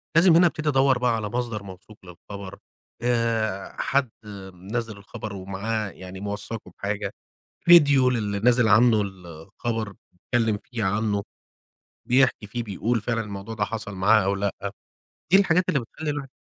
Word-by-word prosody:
لازم 165 0 +6
هنا 175 +1 +7
أبتدي 155 -2 -2
أدوّر 135 -2 +4
بقى 125 -1 +1
على 105 -2 -3
مصدر 115 -2 -3
موثوق 100 +2 -12
للخبر، 100 +2 -10 0.4
آآ، 115 -4 0
حد 135 -2 +1 0.4
منزّل 105 +4 -5
الخبر 105 +1 -8
ومعاه 100 +3 -3
يعني 95 0 -10
موثّقُه 105 +2 -6
بحاجة، 100 0 -3 0.5
فيديو 145 -7 +7
للي 105 -5 -1
نازل 120 +1 +4
عنه 110 +1 +5
الخبر، 100 +4 -5 0.4
يتكلّم 115 -3 +2
فيه 120 -4 -4
عنه، 100 +1 0 0.9
بيحكي 125 -3 +3
فيه 120 +4 -4
بيقول 115 +2 -1
فعلًا 115 +1 -1
الموضوع 105 0 -6
ده 105 -1 0
حصل 105 -1 -5
معاه 95 +2 +4
أو 100 +1 +1
لأ، 100 0 -1 0.8
دي 190 - +9
الحاجات 180 -2 +2
اللي 140 - +2
بتخلّي 150 +6 -5
الواحد 145 -2 -4
110 Hz, 145 wpm, -25 LUFS, 100-125 Hz, 0.9 s, دي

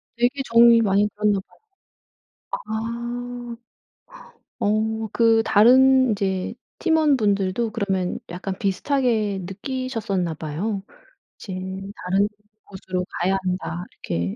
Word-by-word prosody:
되게 245 +4 +1
정이 230 -1 +6
많이 205 0 +3
들었나 210 -1 +2
봐요. 190 - -16 1.1
아. 240 +2 -4 1.0
어 220 +1 0
그 225 -1 +4
다른 260 +3 +6
이제 190 -1 -1 0.3
팀원분들도 235 - +2
그러면 190 -3 -1
약간 185 +2 -5
비슷하게 215 0 0
느끼셨었나 205 -3 -3
봐요. 180 +7 -3 0.6
'이제 190 - -7 0.5
다른 195 +3 +2 0.4
곳으로 185 -2 -4
가야 190 +2 +2
한다.' 180 -1 -3 0.2
이렇게. 85 +2 -2
210 Hz, 220 characters per minute, -23 LUFS, 190-235 Hz, 1.1 s, 정이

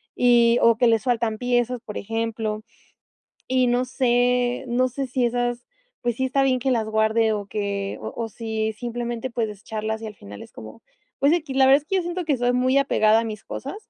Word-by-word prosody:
y 240 -1 +4
o 230 0 +5
que 245 - +4
les 225 0 +3
faltan 230 -3 0
piezas, 245 0 0
por 210 - -6
ejemplo, 225 0 -3 0.9
y 255 -1 +2
no 245 +1 +2
sé, 245 0 +1
no 255 +2 +2
sé 270 +2 -4
si 250 -1 0
esas, 245 0 -2 0.4
pues 240 -1 -1
sí 260 - -1
está 270 +1 +1
bien 255 -1 +2
que 265 - 0
las 220 -3 0
guarde 220 +1 +2
o 205 - -3
que 200 -1 -3
o - - -5
o 230 -1 -3
si 220 -1 -3
simplemente 240 +1 -4
puedes 230 -2 -2
desecharlas 215 +2 -5
y - - -5
al 210 - -8
final 100 - -11
es - - -13
como, 110 - -11 0.4
pues, 280 +3 +4
equis, 300 -6 -3
la 265 - +6
verdad 275 +2 +5
es - - -27
que 385 - 0
yo 365 - +1
siento 350 +1 -4
que 290 -4 +1
soy 245 0 +1
muy 255 +2 +3
apegada 225 -5 +3
a - - -3
mis 215 -2 -6
cosas, 280 +9 -6
240 Hz, 215 wpm, -23 LUFS, 220-255 Hz, 0.9 s, la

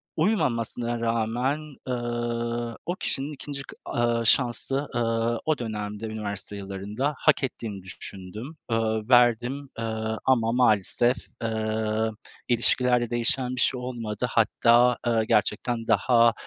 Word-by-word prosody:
uymamasına 120 - 0
rağmen, 120 +6 -1
ııı, 120 -1 -2
o 175 - -1
kişinin 145 -4 -3
2'nci 140 0 -6
kı, - - -12 0.2
ııı, 120 -1 +1
şansı, 135 +4 +2
ııı, 115 0 +1
o 155 -1 +2
dönemde, 105 -2 -4
üniversite 105 -2 -5
yillarında, 100 +8 -3
hak 155 -2 +3
ettiğini 110 -7 -4
düşündüm, 100 - -7 0.2
ııı, 110 -1 0
verdim, 125 +3 +3
ııı, 110 -1 -2
ama 115 -4 +3
maalesef, 120 +1 +3 0.3
ııı, 110 0 0 0.4
ilişkilerde 120 0 +3
değişen 125 +2 0
bir 125 - -1
şey 125 - +2
olmadı. 120 -3 -3
Hatta, 120 +2 +4
ııı, 115 -2 +3
gerçekten 115 +2 0
daha, 115 -2 +4
120 Hz, 115 wpm, -26 LUFS, 110-125 Hz, 0.4 s, Hatta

